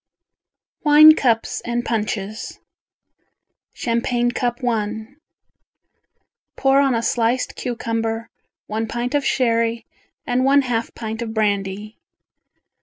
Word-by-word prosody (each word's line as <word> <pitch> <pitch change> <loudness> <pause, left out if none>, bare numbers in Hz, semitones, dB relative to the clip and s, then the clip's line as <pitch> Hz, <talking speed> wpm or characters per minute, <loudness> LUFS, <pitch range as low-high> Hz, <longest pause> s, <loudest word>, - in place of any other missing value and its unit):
WINE 305 +1 +8
CUPS 230 -6 0
and 240 0 -2
PUNCHES 215 -2 -3 1.1
Champagne 240 +1 -1
Cup 240 -1 -2
I 220 -1 -2 1.5
Pour 270 0 +3
on 270 -3 +2
a 230 - -1
sliced 240 +2 0
cucumber 230 -2 -3 0.4
one 220 +1 -3
pint 240 +3 -3
of 290 -1 +1
sherry 230 -2 0 0.4
and 245 +1 0
one 275 +1 +4
half 230 -3 -2
pint 225 0 -5
of 225 -1 -5
brandy. 205 0 -2
230 Hz, 105 wpm, -21 LUFS, 220-245 Hz, 1.5 s, WINE